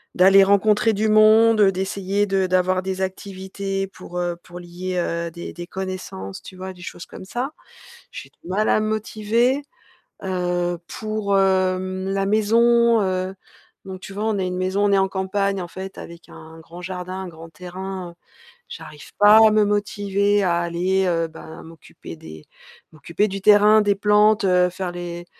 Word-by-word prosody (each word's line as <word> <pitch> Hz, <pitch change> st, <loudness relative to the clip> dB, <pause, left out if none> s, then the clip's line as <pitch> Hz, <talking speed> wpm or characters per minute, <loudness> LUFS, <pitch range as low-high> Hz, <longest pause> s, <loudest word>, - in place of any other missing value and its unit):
d'aller 195 Hz, +2 st, +6 dB
rencontrer 210 Hz, +3 st, +3 dB
du 215 Hz, +1 st, 0 dB
monde, 215 Hz, +1 st, +5 dB
heu, 195 Hz, -1 st, +5 dB
d'essayer 195 Hz, +2 st, -2 dB
de 190 Hz, -1 st, 0 dB
d'avoir 185 Hz, 0 st, +1 dB
des 190 Hz, 0 st, -4 dB
activités 195 Hz, 0 st, -4 dB
pour, 180 Hz, -2 st, -10 dB
heu, 175 Hz, -1 st, -2 dB
pour 175 Hz, 0 st, -11 dB
lier, 180 Hz, +1 st, -6 dB
heu, 170 Hz, -1 st, -2 dB
des 170 Hz, +1 st, -8 dB
des 175 Hz, 0 st, -8 dB
connaissances, 185 Hz, -, -6 dB
tu 185 Hz, -, -12 dB
vois? 190 Hz, +1 st, -6 dB
Des 180 Hz, -, -16 dB
choses 170 Hz, -, -8 dB
comme -, -, -11 dB
ça. 245 Hz, +8 st, -4 dB, 0.6 s
J'ai -, -, -9 dB
du -, -, -19 dB
mal 210 Hz, +3 st, 0 dB
à -, -, +3 dB
me 215 Hz, -, -1 dB
motiver. 225 Hz, +5 st, 0 dB, 0.6 s
Heu, 175 Hz, -1 st, -1 dB
pour, 215 Hz, -2 st, -2 dB
hem, 185 Hz, 0 st, 0 dB
la 195 Hz, 0 st, -1 dB
maison, 230 Hz, +2 st, +3 dB
heu, 185 Hz, 0 st, -2 dB, 0.5 s
donc 190 Hz, -1 st, -8 dB
tu 195 Hz, -, -10 dB
vois, 210 Hz, +2 st, -3 dB
on 215 Hz, -2 st, 0 dB
a 190 Hz, -, -1 dB
une 180 Hz, 0 st, -3 dB
maison, 190 Hz, +2 st, 0 dB
on 200 Hz, -, +1 dB
est 195 Hz, -, +4 dB
en 190 Hz, 0 st, +2 dB
campagne, 195 Hz, +1 st, -1 dB
en 175 Hz, -, -7 dB
fait, 190 Hz, +2 st, -9 dB
avec 170 Hz, 0 st, -11 dB
un 160 Hz, +1 st, -13 dB
grand 170 Hz, +2 st, -12 dB
jardin, 180 Hz, 0 st, -6 dB
un 190 Hz, -, -7 dB
grand 165 Hz, -1 st, -12 dB
terrain. 180 Hz, +2 st, -7 dB
Heu, -, -, -22 dB, 0.5 s
j'arrive 305 Hz, -, -11 dB
pas 210 Hz, +1 st, +7 dB
à -, -, +1 dB
me 215 Hz, 0 st, +3 dB
motiver 205 Hz, 0 st, 0 dB
à 170 Hz, -2 st, +1 dB
aller, 180 Hz, +3 st, 0 dB
heu, 165 Hz, -2 st, 0 dB
bah 160 Hz, +1 st, -11 dB
m'occuper 165 Hz, -1 st, -12 dB
des 80 Hz, -1 st, -12 dB, 0.5 s
m'occuper 170 Hz, +6 st, -1 dB
du 195 Hz, 0 st, -5 dB
terrain, 210 Hz, +1 st, +6 dB
des 205 Hz, -1 st, +2 dB
plantes. 210 Hz, +1 st, +3 dB
Heu, 180 Hz, -1 st, +3 dB
faire 180 Hz, 0 st, -5 dB
les 175 Hz, -1 st, -7 dB
190 Hz, 180 wpm, -22 LUFS, 180-205 Hz, 0.6 s, pas